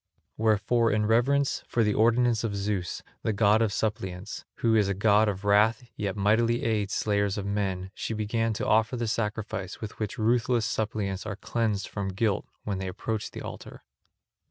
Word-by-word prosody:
Wherefore 110 +2 +2
in 105 0 +1
reverence 135 +6 +2
for 115 - +1
the 105 -1 +2
ordinance 115 +1 +3
of 105 -3 -2
Zeus, 100 -3 -2 0.2
the 110 - 0
god 105 +1 +4
of 110 -2 +2
suppliants, 100 -3 -3
who 115 -1 +1
is 105 -3 +4
a 100 - -1
god 105 +2 +4
of 100 0 -5
wrath 105 +5 +4
yet 100 -3 -2
mightily 110 +4 +2
aids 105 -3 0
slayers 100 -1 +1
of 100 - -3
men, 95 -2 -2
she 115 - -4
began 115 +2 0
to - - -3
offer 110 +3 +2
the 120 -1 -2
sacrifice 105 -3 -3
with 110 -1 -7
which 110 -3 -3
ruthless 115 0 +2
suppliants 105 -3 -2
are 100 - -3
cleansed 110 -1 -1
from 100 -2 -4
guilt 100 +2 0 0.2
when 100 -2 -3
they 95 - -3
approach 105 +3 -3
the - - -8
altar. - - -9
105 Hz, 180 wpm, -27 LUFS, 100-115 Hz, 0.2 s, god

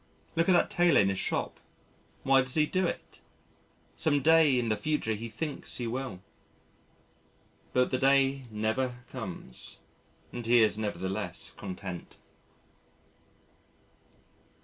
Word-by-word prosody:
Look 165 +2 +2
at - - +7
that 175 - +3
tailor 175 -1 +4
in 95 - +4
his 95 - -1
shop - - -2 0.6
why 135 0 +5
does 130 0 -3
he 155 -1 +4
do 185 +3 0
it? - - -7 0.7
Some 145 -3 +1
day 160 -4 +6
in 120 -2 0
the 110 - +2
future 150 -4 -1
he 115 +2 -5
thinks 140 +6 -4
he 120 - -3
will.... 120 -5 -4 1.5
But 125 0 +2
the 130 - 0
day 135 0 +3
never 120 +4 -2
comes 100 - -6 0.6
and 120 - -5
he 115 0 +5
is 105 -1 +3
nevertheless 100 -1 -4
content. 95 -2 -7
125 Hz, 125 wpm, -29 LUFS, 110-140 Hz, 1.5 s, at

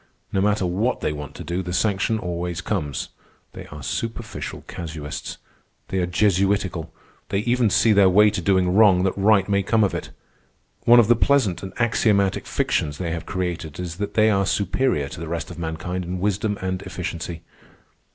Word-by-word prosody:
No 95 - +2
matter 105 -1 +2
what 100 +8 0
they 75 - -1
want 75 -1 -8
to - - -7
do, 85 +2 -2
the 90 -1 -5
sanction 100 +3 +1
always 85 -3 -3
comes. 85 -7 -3 0.4
They - - -9
are 75 -2 -10
superficial 115 - -5
casuists. 80 -2 -6 0.5
They 95 - -1
are 90 - 0
Jesuitical. 95 -2 +1 0.4
They 100 - 0
even 120 0 +2
see 110 +3 +4
their 100 -2 +6
way 105 +3 +5
to 90 - -3
doing 90 -1 +2
wrong 100 -3 +5
that 95 - 0
right 100 -1 +3
may 100 -1 +2
come 110 +3 +2
of 100 - +1
it. - - -4 0.8
One 120 +1 +8
of 115 - +5
the 120 - +5
pleasant 115 -7 +2
and 95 - -6
axiomatic 105 -4 +1
fictions 75 -1 -1
they 85 -3 -3
have 85 0 -5
created 85 -4 -4
is 90 -2 -5
that 105 0 -4
they 110 0 +5
are 100 -2 +1
superior 95 - 0
to 70 - -9
the 85 - -6
rest 85 +1 -4
of 85 - -9
mankind 85 +3 -4
in 90 +1 -4
wisdom 105 +2 0
and 95 0 -2
efficiency. 85 -1 -5
95 Hz, 185 wpm, -23 LUFS, 85-105 Hz, 0.8 s, One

